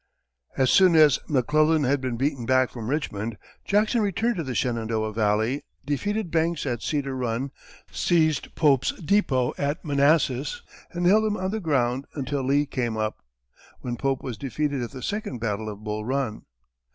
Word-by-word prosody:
As 130 -2 +3
soon 185 -3 +6
as 155 -4 +6
McClellan 155 +3 +3
had 135 +1 +1
been 125 -3 -2
beaten 135 -2 -1
back 130 -1 +3
from 115 -2 -6
Richmond, 115 -7 -2 0.3
Jackson 215 +3 +2
returned 210 +3 0
to 165 - -1
the 130 -4 -4
Shenandoah 110 -2 -1
valley, 110 +5 +1 0.2
defeated 205 +6 -2
Banks 165 -1 0
at 120 -4 -2
Cedar 140 -3 -2
Run, 125 +1 -2 0.4
seized 160 -4 +1
Pope's 140 -5 +3
depot 150 -9 +1
at 145 +4 -2
Manassas, 155 - +2 0.3
and 175 0 -3
held 210 +5 +5
him 215 -1 0
on 185 +1 -2
the 220 - -2
ground 135 - 0
until 140 -1 -2
Lee 140 +3 +2
came 120 -5 -2
up, 110 0 -3 0.6
when 120 -1 -3
Pope 135 +1 -1
was 120 -5 -5
defeated 140 0 -2
at 120 - -3
the 130 -2 -9
second 205 - -3
battle 110 -1 -3
of 105 0 -9
Bull 105 0 -3
Run. 130 -2 -2
140 Hz, 165 wpm, -25 LUFS, 120-160 Hz, 0.6 s, soon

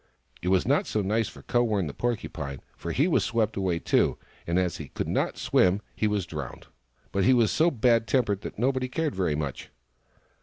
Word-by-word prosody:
It 90 - -4
was 95 0 +3
not - - +2
so 105 - 0
nice 110 +3 +1
for - - -12
Kowern, 110 -6 +1
the 75 - -5
Porcupine, 80 - -3
for 85 - -5
he 140 - +2
was 180 - +2
swept 110 -2 0
away, 95 -3 0
too, - - +2 0.3
and 85 +1 +1
as 90 -3 0
he - - -7
could - - -4
not - - 0
swim, 95 +2 +3 0.2
he 110 - +1
was 105 -3 0
drowned. 75 -6 -7 0.5
But 100 - +1
he 130 +7 +5
was 115 -3 +3
so 160 +3 +4
bad 115 -4 +2
tempered 105 -5 +1
that - - -7
nobody 130 +2 +1
cared 155 +2 -1
very 90 -5 0
much. 75 -3 -4
105 Hz, 200 wpm, -27 LUFS, 90-120 Hz, 0.5 s, he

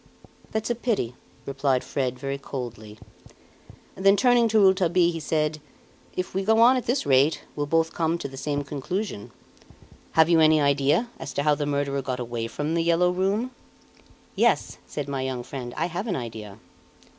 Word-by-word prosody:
"That's 220 +2 -2
a - - +3
pity!" 225 - -1 0.3
replied 135 -2 0
Fred, 130 -2 -2
very 135 +1 -4
coldly. 115 -6 -7 1.0
Then, 195 +1 +4
turning 245 -1 +4
to 220 0 +2
Rouletabille, 185 -3 +4
he 165 - -5
said: 155 0 -1 0.5
"If 185 - -3
we 195 +1 -1
go 220 +3 +3
on 240 +3 +7
at 255 - -3
this 250 +4 0
rate, 140 +3 +3
we'll 145 -1 -2
both 165 +2 +1
come 165 0 0
to 165 - -5
the 135 - -11
same 145 +1 -2
conclusion. 145 - -4 0.8
Have 160 -1 +5
you 170 -1 +4
any 155 -1 +5
idea, 145 - +2
as 135 - -6
to 140 - -1
how 150 0 +4
the 145 0 -2
murderer 140 -1 -1
got 130 -1 -4
away 120 -1 -3
from 145 +7 -3
"The 170 - +1
Yellow 170 +2 +3
Room"?" 195 +7 0 0.8
"Yes," - - +1
said 145 -2 -5
my 135 -2 -3
young 130 -2 -3
friend; 125 -1 -7
"I - - +1
have 180 +5 -4
an 190 - -1
idea." 110 -4 -7
150 Hz, 180 wpm, -25 LUFS, 135-185 Hz, 1.0 s, on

